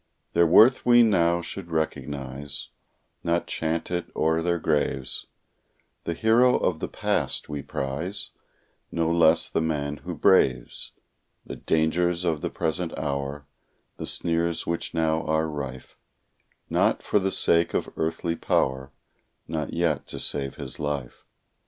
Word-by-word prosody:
Their 85 Hz, 0 st, +5 dB
worth 115 Hz, +10 st, +6 dB
we 120 Hz, -1 st, +7 dB
now 85 Hz, -5 st, +3 dB
should 90 Hz, -1 st, -7 dB
recognize, 70 Hz, -3 st, -4 dB, 0.5 s
Not 85 Hz, 0 st, +1 dB
chant 80 Hz, +1 st, -2 dB
it 90 Hz, -1 st, -2 dB
o'er 80 Hz, +1 st, +2 dB
their 85 Hz, +1 st, +1 dB
graves; 75 Hz, -5 st, 0 dB, 0.8 s
The 85 Hz, -, -2 dB
hero 120 Hz, +5 st, +4 dB
of -, -, 0 dB
the -, -, -3 dB
past -, -, -1 dB
we 75 Hz, -1 st, -4 dB
prize, 75 Hz, +10 st, -4 dB, 0.6 s
No 85 Hz, -1 st, 0 dB
less 85 Hz, -1 st, +4 dB
the -, -, -1 dB
man 75 Hz, -2 st, -2 dB
who -, -, -6 dB
braves 60 Hz, -2 st, +2 dB, 0.5 s
The -, -, -7 dB
dangers 85 Hz, +2 st, +1 dB
of 80 Hz, -4 st, 0 dB
the -, -, -2 dB
present 85 Hz, +1 st, -2 dB
hour, 70 Hz, 0 st, -3 dB, 0.5 s
The -, -, -5 dB
sneers 85 Hz, 0 st, 0 dB
which 85 Hz, 0 st, -3 dB
now 80 Hz, -1 st, +1 dB
are 80 Hz, +1 st, +1 dB
rife, 70 Hz, -4 st, -6 dB, 0.7 s
Not -, -, +1 dB
for 105 Hz, -, +2 dB
the 95 Hz, 0 st, 0 dB
sake 85 Hz, -2 st, +3 dB
of -, -, 0 dB
earthly 85 Hz, +1 st, -1 dB
power, 65 Hz, -3 st, 0 dB, 0.6 s
Nor 80 Hz, -2 st, -2 dB
yet 85 Hz, -2 st, 0 dB
to -, -, -7 dB
save 70 Hz, -2 st, -3 dB
his 65 Hz, -3 st, -7 dB
life. 75 Hz, -4 st, -4 dB
80 Hz, 140 wpm, -26 LUFS, 75-85 Hz, 0.8 s, we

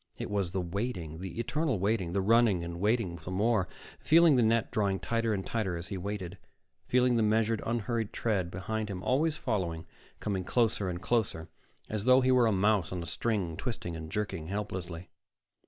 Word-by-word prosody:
It -, -, -5 dB
was 100 Hz, -3 st, 0 dB
the 95 Hz, +1 st, -2 dB
waiting, 90 Hz, -3 st, -4 dB
the 90 Hz, 0 st, -6 dB
eternal 140 Hz, +2 st, 0 dB
waiting, 100 Hz, 0 st, 0 dB
and 95 Hz, 0 st, 0 dB
running, 95 Hz, -8 st, +3 dB
waiting 105 Hz, -4 st, 0 dB
some 90 Hz, +4 st, -6 dB
more, 105 Hz, -2 st, +2 dB, 0.3 s
feeling 165 Hz, -2 st, +6 dB
the 125 Hz, -, +4 dB
net 115 Hz, -1 st, +2 dB
drawing 100 Hz, -3 st, +1 dB
tighter 115 Hz, +3 st, 0 dB
and 95 Hz, -3 st, -2 dB
tighter 100 Hz, -7 st, -1 dB
as 85 Hz, +1 st, -6 dB
he -, -, -3 dB
waited, 100 Hz, -1 st, -5 dB, 0.5 s
feeling 125 Hz, -1 st, +3 dB
the -, -, +3 dB
measured, 110 Hz, +1 st, +2 dB
unhurried 115 Hz, -1 st, -1 dB
tread 100 Hz, -7 st, -1 dB
behind 105 Hz, +5 st, -3 dB
him, 90 Hz, -2 st, -5 dB
always 155 Hz, +4 st, +1 dB
following, 90 Hz, -, -2 dB, 0.3 s
coming 95 Hz, -3 st, -2 dB
closer 110 Hz, -2 st, +1 dB
and 90 Hz, +1 st, -5 dB
closer, 100 Hz, -6 st, 0 dB, 0.4 s
as 110 Hz, -1 st, -3 dB
though 130 Hz, +1 st, +6 dB
he 130 Hz, 0 st, +3 dB
were 125 Hz, -2 st, +5 dB
a -, -, +3 dB
mouse 100 Hz, -2 st, +2 dB
on 90 Hz, -2 st, -3 dB
a -, -, -6 dB
string, 95 Hz, -4 st, -1 dB
twisting 90 Hz, -5 st, -4 dB
and 80 Hz, -1 st, -7 dB
jerking 95 Hz, -6 st, -3 dB
helplessly. 90 Hz, -3 st, -5 dB
105 Hz, 185 wpm, -30 LUFS, 90-115 Hz, 0.5 s, feeling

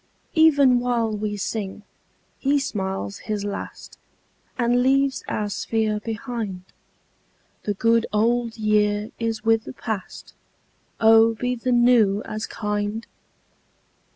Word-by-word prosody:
37 315 Hz, -, +4 dB
Even 275 Hz, -5 st, +4 dB
while 235 Hz, -3 st, 0 dB
we 210 Hz, 0 st, -3 dB
sing 205 Hz, 0 st, -4 dB, 0.6 s
he 285 Hz, +1 st, +2 dB
smiles 190 Hz, -, -3 dB
his 210 Hz, -1 st, -4 dB
last 205 Hz, -, -7 dB, 0.6 s
And 245 Hz, 0 st, +2 dB
leaves 270 Hz, +1 st, +2 dB
our 210 Hz, -, -2 dB
sphere 215 Hz, +1 st, -1 dB
behind. 220 Hz, -4 st, -5 dB, 1.0 s
The 205 Hz, -, -1 dB
good 230 Hz, +2 st, +2 dB
old 230 Hz, +2 st, +1 dB
year 210 Hz, 0 st, +1 dB
is 225 Hz, -2 st, -2 dB
with 225 Hz, 0 st, +3 dB
the -, -, -7 dB
past; 220 Hz, -5 st, -6 dB, 0.7 s
Oh 225 Hz, 0 st, +6 dB
be 245 Hz, +2 st, -1 dB
the 250 Hz, +1 st, -2 dB
new 240 Hz, -4 st, +4 dB
as 215 Hz, +1 st, -5 dB
kind 210 Hz, +1 st, -3 dB
225 Hz, 120 wpm, -23 LUFS, 210-240 Hz, 1.0 s, Oh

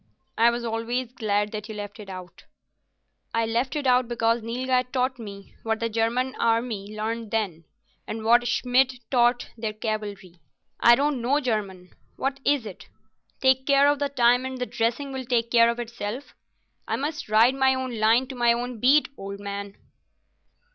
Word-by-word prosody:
"I 230 Hz, +1 st, +5 dB
was 235 Hz, 0 st, -3 dB
always 230 Hz, +2 st, -2 dB
glad 210 Hz, -3 st, 0 dB
that 210 Hz, -1 st, -6 dB
you 220 Hz, -, -6 dB
left 205 Hz, 0 st, -7 dB
it 205 Hz, -2 st, -10 dB
out." 185 Hz, -2 st, -10 dB, 0.9 s
"I 230 Hz, 0 st, +2 dB
left 235 Hz, +5 st, -1 dB
it 295 Hz, -2 st, -2 dB
out 250 Hz, -1 st, +3 dB
because 230 Hz, 0 st, +1 dB
Nilghai 250 Hz, +3 st, 0 dB
taught 255 Hz, -1 st, 0 dB
me 200 Hz, -3 st, -10 dB
what 225 Hz, -1 st, -1 dB
the 230 Hz, -, -1 dB
Germany 230 Hz, +4 st, 0 dB
army 225 Hz, -3 st, 0 dB
learned 225 Hz, +1 st, -3 dB
then, 190 Hz, -8 st, -2 dB, 0.4 s
and 220 Hz, 0 st, -5 dB
what 240 Hz, +2 st, +5 dB
Schmidt 250 Hz, +2 st, +2 dB, 0.2 s
taught 240 Hz, -1 st, +2 dB
their 220 Hz, -2 st, -4 dB
cavalry. 205 Hz, -5 st, -5 dB, 0.4 s
I 235 Hz, -, +7 dB
don't 280 Hz, -1 st, 0 dB
know 265 Hz, +5 st, +2 dB
German. 200 Hz, -8 st, -3 dB, 0.2 s
What 275 Hz, 0 st, -2 dB
is 285 Hz, -5 st, +2 dB
it? 195 Hz, -4 st, -10 dB, 0.5 s
"Take 265 Hz, 0 st, +3 dB
care 280 Hz, 0 st, +5 dB
of 290 Hz, 0 st, +2 dB
the 285 Hz, -1 st, 0 dB
time 245 Hz, -2 st, +3 dB
and 260 Hz, 0 st, -5 dB
the 250 Hz, -, -2 dB
dressing 240 Hz, +5 st, -2 dB
will 260 Hz, -1 st, -5 dB
take 235 Hz, -2 st, 0 dB
care 230 Hz, -1 st, +6 dB
of 235 Hz, -, -1 dB
itself." 240 Hz, +2 st, -6 dB, 0.5 s
I -, -, 0 dB
must 295 Hz, -3 st, -4 dB
ride 225 Hz, +4 st, +5 dB
my 265 Hz, -1 st, +3 dB
own 255 Hz, -3 st, -4 dB
line 225 Hz, +4 st, +4 dB
to 265 Hz, -, -6 dB
my 240 Hz, -1 st, +3 dB
own 240 Hz, 0 st, -4 dB
beat, 275 Hz, +6 st, +4 dB
old 200 Hz, 0 st, -7 dB
man." 200 Hz, 0 st, -6 dB
235 Hz, 175 wpm, -25 LUFS, 215-255 Hz, 0.9 s, I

